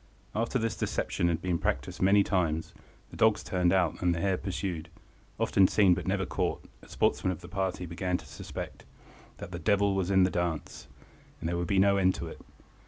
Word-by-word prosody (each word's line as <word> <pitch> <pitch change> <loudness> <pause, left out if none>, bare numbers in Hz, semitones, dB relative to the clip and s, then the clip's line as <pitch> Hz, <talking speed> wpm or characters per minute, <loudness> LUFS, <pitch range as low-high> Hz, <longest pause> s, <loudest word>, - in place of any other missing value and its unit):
After 115 +4 0
this 115 -2 -1
deception 85 - -1
had 85 0 -1
been 90 -2 0
practised - - -2
many 100 +2 +5
times, 80 -5 -1 0.4
the - - -10
dogs 110 -2 +3
turned 90 -2 +1
out 90 -4 +2
the 85 -2 +1
hare 95 +2 +1
pursued, 90 -3 -4 0.5
often 95 -1 +4
seen 95 -3 +4
but 90 +1 -4
never 95 0 0
caught, - - -2 0.2
a - - -17
sportsman 95 - +1
of 85 -2 -6
the 85 - -10
party 95 -1 -2
began 90 +2 -2
to - - -13
suspect - - -8 0.5
"that - - -8
the 85 - -5
devil 100 +3 +2
was 95 -1 -1
in 95 -1 +5
the 90 - +2
dance," 85 -3 -3 0.5
and - - -4
there 85 - -1
would 85 0 -2
be 100 - +1
no 100 +1 +5
end 95 -1 +3
to - - -5
it. - - -9
95 Hz, 200 wpm, -29 LUFS, 85-100 Hz, 0.5 s, many